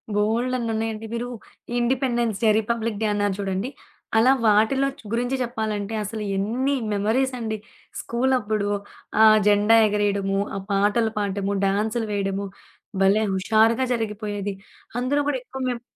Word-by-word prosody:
బోల్డన్నున్నయ్యండి. 225 0 -1
మీరు 235 +1 -2 0.5
independence 240 -3 0
day, 220 - +5
republic 225 -1 -2
day - - +2
అన్నారు 205 -1 0
చూడండి 195 +4 -2 0.5
అలా 240 +4 +6
వాటిలో 220 +6 +4
చ్ - - -14
గురించి 245 +3 0
చెప్పాలంటే 220 -3 -3
అసలు 215 +1 -5
ఎన్నీ 240 +8 0 0.2
మెమోరీసండి. 225 +2 0 0.4
స్కూలప్పుడు 235 -4 0 0.5
ఆ - - +9 0.2
జెండా 210 +2 +5
ఎగరేయడము, 200 -2 0 0.2
ఆ - - -2
పాటలు 205 +3 +2
పాడటము, 200 -1 -1
డాన్సులు 215 +3 0
వేయడము 200 0 -1 0.6
భలే 200 +3 +4
హుషారుగా 220 +6 +3
జరిగిపోయేది. 210 -3 -3 0.5
అందులో 275 +4 +1
గూడా 290 -2 +1
ఎక్కువ 265 +1 -8
మేము 240 -1 -3
220 Hz, 120 wpm, -24 LUFS, 205-240 Hz, 0.6 s, ఆ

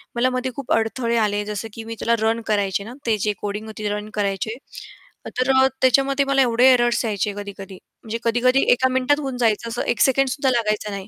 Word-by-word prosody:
मला 245 +2 +2
मध्ये 255 0 -2
खूप 275 -3 -7
अडथळे 230 +1 0
आले 205 0 0
जसं 210 +1 -4
की 225 - -8
मी 225 0 -7
त्याला 235 - +2
रन 230 +1 0
करायचे 200 -2 0
ना 225 +4 -9
ते 225 -2 +1
जे 210 +1 -1
कोडिंग 210 +1 -4
होती 215 -1 -5
रन 210 +1 -4
करायचे, 205 +2 -2 0.8
तर 255 +1 +1
अ, 265 0 +5
त्याच्यामध्ये 275 +2 +3
मला 275 0 +2
एवढे 250 +1 +5
एररर्स 240 -1 +2
यायचे 210 -1 -1
कधी-कधी 200 -1 -8 0.3
म्हणजे 225 0 -4
कधी-कधी 250 +3 +2
एका 260 +1 +3
मिनिटात 260 +3 +2
होऊन 270 -4 -4
जायचं 230 -1 0
असं 235 +1 -3
एक 240 - 0
सेकंडसुद्धा 270 0 +2
लागायचं 215 -3 -1
नाही. 195 -1 -6
230 Hz, 200 wpm, -21 LUFS, 210-255 Hz, 0.8 s, अ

